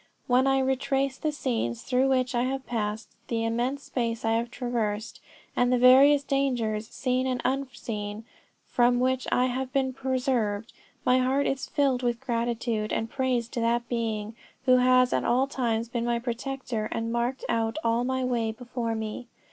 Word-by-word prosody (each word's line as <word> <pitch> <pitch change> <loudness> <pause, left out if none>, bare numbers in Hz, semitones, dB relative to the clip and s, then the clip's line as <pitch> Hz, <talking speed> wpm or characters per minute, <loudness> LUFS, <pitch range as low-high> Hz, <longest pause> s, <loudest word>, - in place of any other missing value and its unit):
When 255 +1 +3
I 270 0 +3
retrace 265 +1 0
the 310 - 0
scenes 235 - -2
through 255 +1 +2
which 255 -1 +1
I 240 - +1
have 265 +1 -2
passed, 215 -2 -3 0.2
the 230 -1 -1
immense 245 +5 -1
space 230 -2 -2
I 225 - +2
have 230 +1 0
traversed, 230 -4 -3 0.4
and 245 0 +2
the 250 - +4
various 270 +3 +7
dangers, 240 -7 0
seen 255 +1 -1
and 255 -1 -1
unseen, 225 -5 -3 0.4
from 245 0 +3
which 260 0 +1
I 250 - +3
have 255 +1 -2
been 265 -1 0
preserved, 250 -5 -1 0.3
my 255 0 +4
heart 265 +2 +2
is 270 - -1
filled 270 -3 +1
with 240 -2 0
gratitude 235 -3 -1
and 225 0 -2
praise 255 -3 0
to 245 - -4
that 235 +1 +1
Being, 225 -2 -2 0.3
who 255 -1 +6
has 255 0 +4
at - - +1
all 250 +3 +3
times 235 -4 -1
been 235 0 -2
my 240 0 +1
protector 240 -2 -3
and 230 0 -2
marked 240 +3 -1
out 225 +3 0
all 230 +1 +2
my 260 +1 -1
way 235 -3 0
before 235 0 -4
me. 220 +2 -5
245 Hz, 170 wpm, -27 LUFS, 230-260 Hz, 0.4 s, various